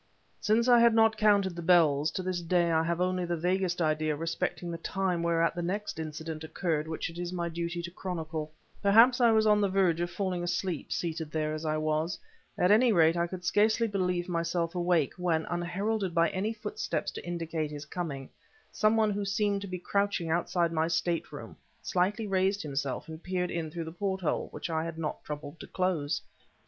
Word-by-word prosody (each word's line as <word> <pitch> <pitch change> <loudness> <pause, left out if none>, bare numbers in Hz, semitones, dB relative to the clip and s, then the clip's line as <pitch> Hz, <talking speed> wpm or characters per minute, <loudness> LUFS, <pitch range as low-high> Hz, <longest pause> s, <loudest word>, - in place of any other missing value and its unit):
Since 225 +3 +2
I 245 -1 +7
had 235 -1 +5
not 225 -1 +5
counted 205 -4 +3
the 170 - -5
bells, 160 -4 +4
to 185 - -3
this 180 -1 -2
day 170 0 +2
I 160 -1 +3
have 170 +1 -1
only 185 0 0
the 175 -1 -2
vaguest 180 +1 0
idea 155 0 +1
respecting 165 +2 -3
the 165 - -5
time 185 0 -1
whereat 165 0 +2
the 175 - -4
next 190 +1 -3
incident 160 0 -5
occurred 160 -1 -2
which 160 0 -3
it 170 - -9
is 175 0 -3
my 170 -1 -2
duty 170 +1 -3
to 170 - -6
chronicle. 160 -4 -4 0.3
Perhaps 230 +5 +6
I 235 - +6
was 220 -1 +4
on 210 -1 +4
the 200 - +2
verge 185 -3 +2
of 175 - -1
falling 180 0 -2
asleep, 175 -1 -2
seated 160 -2 -2
there 155 0 -1
as 155 +1 -5
I 155 0 0
was; 155 +2 -1 0.4
at 180 - +3
any 230 +3 +5
rate, 165 -4 +4
I 170 0 +1
could 180 0 -7
scarcely 220 +4 +3
believe 180 -4 -1
myself 170 -1 -1
awake, 175 -5 +1
when, 170 -3 0
unheralded 185 +2 -2
by 170 -1 +4
any 200 +4 -1
footsteps 225 - -3
to - - -8
indicate 165 -3 -3
his 145 -1 -7
coming, 145 -5 -5 0.4
some 215 +1 +2
one 215 -1 +3
who 205 0 -2
seemed 200 0 0
to 200 - -6
be 185 -1 -4
crouching 200 -2 -1
outside 170 0 +1
my 160 0 +1
stateroom, 170 0 -2 0.3
slightly 200 +5 0
raised 195 0 +1
himself 140 -2 -3
and 160 0 -8
peered 180 0 -2
in 165 -2 -3
through 165 +1 -5
the 160 - -6
porthole 190 -1 -2
which - - -6
I 160 -2 -1
had 165 -1 -5
not 155 -2 -4
troubled 150 +1 -7
to - - -9
close. 165 -6 -1
175 Hz, 200 wpm, -29 LUFS, 160-195 Hz, 0.4 s, I